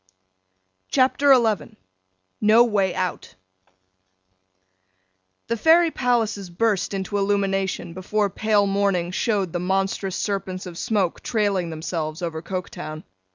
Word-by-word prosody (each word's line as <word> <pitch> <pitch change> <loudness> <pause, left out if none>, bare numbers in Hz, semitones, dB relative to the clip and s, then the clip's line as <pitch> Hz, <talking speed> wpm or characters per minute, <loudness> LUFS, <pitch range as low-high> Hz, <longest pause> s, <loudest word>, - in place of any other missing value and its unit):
CHAPTER 275 +2 +3
XI 225 - +2 0.6
NO 220 +2 +6
WAY 200 -6 +1
OUT 185 -2 -3 2.1
THE 230 - -1
Fairy 325 +7 +4
palaces 225 -8 0
burst 200 +1 0
into 195 +1 -2
illumination, 195 -3 -1
before 200 +2 -1
pale 210 0 +2
morning 195 -3 0
showed 195 -3 -1
the 175 - -1
monstrous 190 +1 -1
serpents 190 -2 -3
of 175 -2 -8
smoke 200 -6 0
trailing 200 -6 0
themselves 160 0 -4
over 160 -2 -3
Coketown. 170 -3 -6
195 Hz, 110 wpm, -23 LUFS, 180-215 Hz, 2.1 s, NO